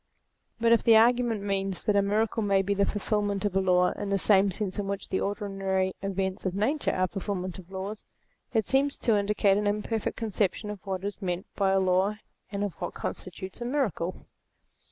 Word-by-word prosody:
But 230 0 +3
if 235 - +6
the 230 - +6
argument 235 -2 +3
means 195 -2 -2
that 210 - +2
a 200 - +5
miracle 215 +3 +1
may 200 -2 +2
be 200 +1 0
the 200 0 +2
fulfilment 205 -1 -1
of 200 -2 -1
a 195 - +4
law 180 -1 +3
in 205 - -5
the 200 - +2
same 195 0 +4
sense 190 +1 -2
in 200 - -2
which 200 0 -4
the 190 - 0
ordinary 195 -2 -1
events 195 -1 -2
of 185 -1 -2
Nature 270 +9 +1
are 185 0 +2
fulfilments 185 -1 -4
of 180 -1 -13
laws, 195 +3 -5 0.5
it 220 -3 +1
seems 275 +4 +1
to 230 -4 +2
indicate 200 -1 +2
an 210 - 0
imperfect 210 +1 -1
conception 210 -1 -1
of 205 -3 -9
what 190 -1 -3
is 205 +1 -4
meant 180 0 -2
by 195 -1 +2
a 195 0 +3
law, 190 +2 +2 0.4
and 200 0 -2
of 200 -4 -2
what - - -4
constitutes 190 +3 -5
a - - -2
miracle. 225 - -2
200 Hz, 200 wpm, -28 LUFS, 190-210 Hz, 0.5 s, if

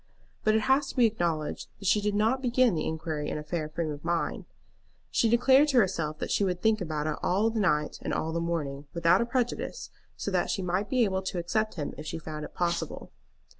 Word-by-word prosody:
But 215 0 +3
it 220 - +3
has 270 +4 +3
to - - -8
be 250 -3 +5
acknowledged 170 -8 -1
that 200 - -11
she 200 +3 +4
did 205 0 0
not 225 +5 +2
begin 250 -2 +3
the 155 -2 -1
inquiry 155 -2 -3
in - - -3
a 150 - -5
fair 155 0 -3
frame 155 0 -2
of 145 -1 -8
mind. 170 0 -1 0.7
She 230 - +3
declared 260 +5 +5
to 275 -4 +2
herself 165 -8 +1
that - - -4
she - - +2
would 180 -2 0
think 220 +1 +2
about 155 -3 -2
it 155 -1 -1
all 210 +5 +2
the 225 - -2
night 150 -7 +1
and - - -3
all 160 +1 -1
the 170 - 0
morning 150 -4 -3
without 170 +3 +4
a 235 - 0
prejudice, 245 - -2 0.3
so - - -3
that - - +1
she 195 - -1
might 185 +3 -1
be 255 -2 +3
able 190 -3 0
to 190 -1 -4
accept 215 +6 -1
him 150 -5 -4
if 150 - -7
she 150 - -3
found 155 -1 -6
it - - -13
possible. 175 -1 -2
180 Hz, 235 wpm, -28 LUFS, 155-220 Hz, 0.7 s, be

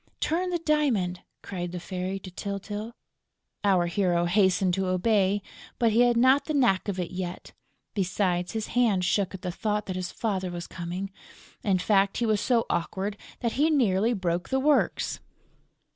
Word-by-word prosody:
"Turn 355 +4 0
the 355 - 0
diamond!" 275 - +1 0.2
cried 175 -3 -4
the 180 - -4
Fairy 185 +2 -4
to 185 - -9
Tyltyl. 205 +4 -5 0.7
Our 190 -4 +3
hero 175 -1 +1
hastened 190 0 +3
to 190 0 0
obey, 195 +1 +2 0.3
but 230 -2 +3
he 220 - +3
had 240 -1 +4
not 260 +4 +5
the 310 - -2
knack 235 -10 +3
of 195 -2 -2
it 175 - -3
yet; 180 -1 -5 0.4
besides, 180 -2 0
his 220 -1 -3
hand 220 -7 +3
shook 195 0 +1
at 185 - -10
the 180 - -2
thought 210 +2 -1
that 185 - -4
his 185 -1 -3
father 190 -5 -2
was 175 -1 -5
coming. 180 +3 -5 0.5
In 195 -5 +2
fact, 195 +1 +2
he 240 - +1
was 215 -2 +2
so 235 -3 +2
awkward 195 +4 -2 0.3
that 235 - 0
he 295 +6 +2
nearly 230 -6 +3
broke 175 -4 -2
the 265 - +1
works. 290 +2 +1
195 Hz, 175 wpm, -27 LUFS, 180-230 Hz, 0.7 s, not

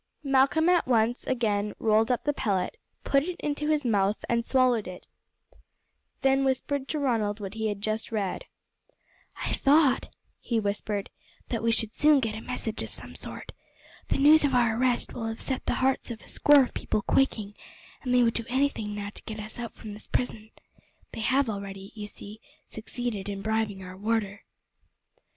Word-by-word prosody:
Malcolm 275 +4 +3
at 355 -5 +3
once 235 0 +2
again 210 -5 0
rolled 220 0 +3
up 250 - +1
the 290 - +1
pellet, 195 -9 -1 0.3
put 275 - +3
it 350 +4 -5
into 300 +1 -2
his 300 -3 +1
mouth 205 -2 +2
and 235 0 +1
swallowed 250 -5 +2
it, 180 -1 -9 0.4
and - - -27 0.6
then 270 0 +4
whispered 270 +1 -1
to 310 - -2
Ronald 225 -7 0
what 200 -1 -6
he 220 0 -2
had 205 -1 -3
just 215 +2 -2
read. 200 -4 -2 1.0
"I - - -1
thought," 285 -1 +3 0.3
he 230 -2 -1
whispered, 205 -1 -2 0.4
"that 230 - -1
we 230 0 +2
should 225 -1 0
soon 300 -1 +5
get 225 -4 -1
a 220 - -6
message 225 -3 -4
of - - -4
some - - -6
sort. - - -7 0.6
The - - 0
news 300 +3 +7
of 275 -3 +2
our 235 -3 +3
arrest 245 0 +1
will 225 -2 -4
have 225 0 -4
set 265 - -3
the - - +1
hearts 265 -1 +1
of 230 -2 -7
a - - -16
score 290 -2 +6
of 250 - -5
people 210 - -2
quaking, 215 -6 +1 0.5
and 250 - -3
they 250 0 +5
would 230 -1 +3
do 230 - -3
anything 250 -5 0
now 205 0 -5
to - - -7
get 220 0 -6
us 215 +2 -7
out 235 -1 -5
from 215 -2 -8
this 210 - -11
prison. 220 -3 -2 0.6
They - - -6
have 265 +4 +2
already, 200 -2 -6
you 210 -2 -7
see, 210 +1 -9 0.3
succeeded 220 -2 -4
in 200 -1 -5
bribing 220 -3 -1
our 185 0 -9
warder." 205 0 -2
225 Hz, 185 wpm, -27 LUFS, 210-265 Hz, 1.0 s, news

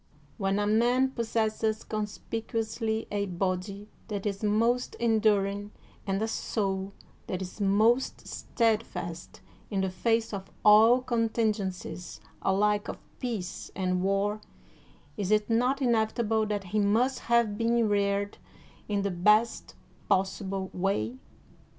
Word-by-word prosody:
When 195 0 +1
a 205 - +1
man 240 +5 +3
pos 235 -3 -3
sesses 220 -1 0
conspicuously 220 +1 -3
a 200 -1 -1
body 185 +3 -3 0.2
that 205 -2 -4
is 200 -1 -2
most 230 +4 +1
enduring 205 -3 +1 0.3
and 195 0 0
a - - 0
soul 195 -3 -2 0.3
that 185 - -3
is 190 +3 -7
most 215 +6 +2
steadfast 215 -7 -2 0.3
in 195 -3 0
the 190 -1 -1
face 225 +4 0
of 195 -1 -5 0.2
all 225 +4 +7
contingencies 215 -7 -1 0.2
alike 205 +2 +2
of - - -5 0.2
peace 220 -8 -4
and 185 -1 0
war, 200 +2 0 0.8
is 200 -3 -2
it 215 +1 +2
not 250 +4 +2
inevitable 220 -2 +1
that 205 -1 -2
he 215 - +3
must 225 +6 +2
have 235 -3 +2
been 230 +1 +2
reared 200 0 0 0.5
in 205 -1 0
the 200 - 0
best 210 +6 +2 0.3
possible 190 0 0
way 130 - -1
210 Hz, 125 wpm, -28 LUFS, 195-225 Hz, 0.8 s, all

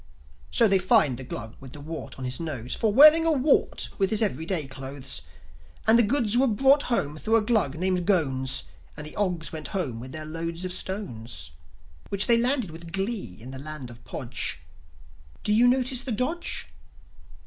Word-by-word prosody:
So 230 - +4
they 195 -2 +4
fined 145 -8 +3
the - - -6
Glug 115 -2 -6
with 130 -1 -11
the 150 - -8
wart 160 +3 -8
on 130 - -6
his 125 0 -2
nose 135 -7 -4
For 220 - 0
wearing 305 +7 +8
a 330 - +3
wart 285 -1 +1
with 195 -1 +2
his 220 0 +1
everyday 165 -3 0
clothes. 135 0 -4 0.6
And 220 +2 +6
the - - +9
goods 230 -1 +1
were 265 +2 +4
brought 270 +6 +4
home 155 - 0
thro' 220 +6 +1
a 225 - +5
Glug 205 - +1
named 180 0 -1
Ghones; 135 - +2 0.3
And - - -4
the 150 - -4
Ogs 180 -5 -2
went 155 - -5
home 130 -11 -3
with 130 +2 -9
their 155 +2 -5
loads 165 +3 -4
of 185 - -3
stones, 115 - -3 0.6
Which 200 0 +3
they 235 -1 +5
landed 245 - 0
with 165 +1 -10
glee 195 - -3
in 125 +4 -9
the 135 - -8
land 145 -4 -7
of 120 0 -15
Podge. 70 - -4 0.8
Do 210 - +1
you 235 +3 +5
notice 255 0 +1
the 265 - -2
dodge? 255 +10 -2
180 Hz, 190 wpm, -26 LUFS, 135-230 Hz, 0.8 s, the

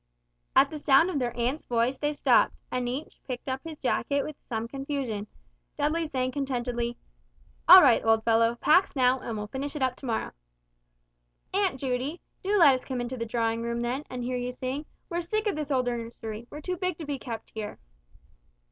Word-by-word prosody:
At - - +6
the 305 - -5
sound 290 +5 +5
of 295 - -1
their 245 -2 -2
aunt's 250 +6 -1
voice 240 +2 +1
they 295 0 0
stopped; 295 - +3 0.2
and 250 -1 -1
each 270 +5 -6
picked 250 -1 -5
up 260 0 -2
his 320 -2 -7
jacket 280 +1 0
with 305 - -6
some 225 -1 -2
confusion, 270 -5 -4 0.5
Dudley 310 +3 0
saying 255 -3 -1
contentedly, 245 -3 -2 0.7
"All 365 +2 +11
right, 255 -5 +5
old 225 0 +3
fellow, 230 +1 +3
pax 315 +10 +3
now, 255 0 +3
and 230 -3 -5
we'll 210 - -3
finish 275 +7 -5
it 285 - -1
up 255 -1 +1
to 270 - -8
morrow." 225 -2 -1 1.2
"Aunt 380 -8 +1
Judy, 265 +5 -2 0.2
do 405 +2 +1
let 310 -7 +8
us 255 - -2
come 260 -2 -4
into 245 +1 -3
the 230 -2 -4
drawing 230 0 0
room 235 0 -2
then, 255 +4 -2
and 250 -1 -5
hear 250 +1 -2
you 245 0 -3
sing; 260 +4 -4 0.2
we're 345 -1 -2
sick 430 +6 -1
of 415 - +1
this 300 -1 -4
old 260 -3 +1
nursery, 230 -2 -5
we're 295 - -8
too 365 +3 -3
big 365 -3 -2
to 320 - -6
be 285 -2 -3
kept 230 -3 -7
here." 215 -1 -5
255 Hz, 200 wpm, -28 LUFS, 235-295 Hz, 1.2 s, All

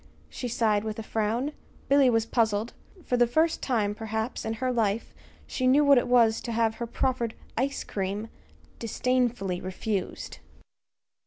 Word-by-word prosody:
she 250 - -4
sighed, 220 -3 +1
with 215 -1 -4
a 225 - -4
frown. 225 +6 -1 0.4
Billy 275 -2 +5
was 225 -2 +2
puzzled. 225 -1 0 0.3
For 250 - +1
the 240 0 +4
first 315 +7 +2
time, 215 -6 0
perhaps, 220 +2 -3
in 220 - -1
her 255 +3 -1
life, 220 -2 0 0.3
she 255 - -1
knew 285 +3 +5
what 280 -3 +7
it - - -3
was 235 -3 +4
to 235 - -5
have 225 -1 +1
her 235 - -3
proffered 240 -1 -1 0.2
"ice 275 +3 -1
cream" 200 +3 -3 0.5
disdainfully 235 -5 0
refused. 190 +1 -4
230 Hz, 155 wpm, -27 LUFS, 220-250 Hz, 0.5 s, what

